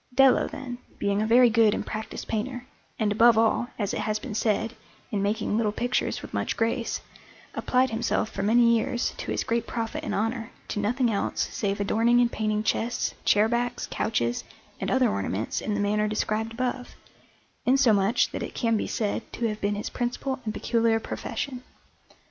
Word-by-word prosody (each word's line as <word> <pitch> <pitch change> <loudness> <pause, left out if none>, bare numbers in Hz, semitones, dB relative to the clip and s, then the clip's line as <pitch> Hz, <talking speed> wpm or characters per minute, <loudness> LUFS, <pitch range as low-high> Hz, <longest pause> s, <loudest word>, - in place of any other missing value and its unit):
Dello, 270 -1 +5
then, 255 -4 -7 0.2
being 200 +1 0
a 215 - 0
very 240 +1 +6
good 220 -2 +4
and - - -3
practised 215 0 -5
painter, 245 +3 -3 0.3
and 215 -2 +1
above 230 +2 +6
all, 225 +2 +3
as 205 -3 -1
it - - -2
has 215 0 0
been 225 +1 -7
said, 220 +1 0 0.4
in 205 -3 0
making 210 +1 0
little 220 -2 +1
pictures 245 +4 -1
with - - -9
much - - -1
grace, 230 +1 -1 0.5
applied 255 0 +1
himself 225 -1 0
for 195 - -4
many 235 +3 +5
years, 240 +2 0
to - - -6
his - - 0
great 235 0 -1
profit 240 +7 -3
and - - -2
honour, 225 +2 -1 0.2
to - - -2
nothing 235 +3 +1
else 200 - -1
save 200 -2 -1
adorning 225 +4 +3
and 240 -1 +3
painting 215 -1 -1
chests, 235 +2 0
chair 210 +1 +5
backs, 240 +1 -1
couches, 120 - 0 0.4
and - - -2
other - - +3
ornaments 100 +2 -2
in 210 - -2
the - - -1
manner 210 +1 +1
described 215 +1 -1
above, 250 +1 -3 0.7
insomuch 235 -4 +3
that - - -4
it - - -5
can 230 -2 +1
be - - -1
said 215 0 -1
to 235 - -3
have 215 -1 -4
been 205 +1 0
his 205 - -4
principal 255 +2 -2
and 215 - -2
peculiar 230 -1 +2
profession. 245 +3 -4
225 Hz, 185 wpm, -26 LUFS, 210-240 Hz, 0.7 s, very